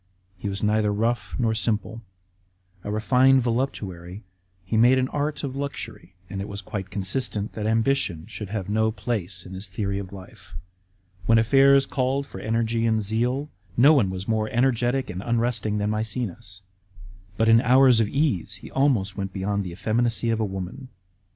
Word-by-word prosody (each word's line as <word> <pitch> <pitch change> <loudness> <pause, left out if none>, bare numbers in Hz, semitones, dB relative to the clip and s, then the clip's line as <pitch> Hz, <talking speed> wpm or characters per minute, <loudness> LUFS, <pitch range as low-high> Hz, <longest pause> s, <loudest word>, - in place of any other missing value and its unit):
He 95 +2 -5
was 100 +1 -3
neither 105 0 +2
rough 115 +4 -1
nor 115 -3 +1
simple. 110 +1 -2 0.8
A - - -5
refined 130 +5 +4
voluptuary, 105 -7 -3 0.4
he 105 - -2
made 120 +4 +5
an 130 0 +1
art 150 +1 -2
of 135 -2 -4
luxury; 140 -9 -6
and 95 +1 -5
it 100 - -5
was 100 -1 -5
quite 95 -1 -5
consistent 105 +2 -2
that 105 -1 -3
ambition 115 -7 0
should 105 -2 -7
have 100 -3 -4
no 110 +2 +1
place 95 -4 -4
in 95 - -9
his 95 +1 -6
theory 100 0 -2
of 95 -2 -7
life. 95 -3 -13 0.7
When 115 - +6
affairs 135 +4 +5
called 135 +1 -1
for 95 - -10
energy 115 +2 0
and 110 -1 +1
zeal, 125 +7 -1 0.3
no 140 +6 +7
one 120 -11 +3
was 95 +1 -5
more 110 -1 0
energetic 125 0 +1
and 90 +1 -5
unresting 115 -1 0
than 105 0 0
Maecenas; 110 -3 -4 0.7
but 115 - +2
hi 115 +1 +6
hours 130 -1 +5
of 110 - +2
ease 105 - 0
he 95 - -12
almost 120 -9 +1
went 95 -1 -4
beyond 100 +1 -1
the 90 - -6
effeminacy 115 +5 0
of 115 - 0
a - - +1
woman. 95 +6 -6
110 Hz, 170 wpm, -24 LUFS, 100-125 Hz, 0.8 s, no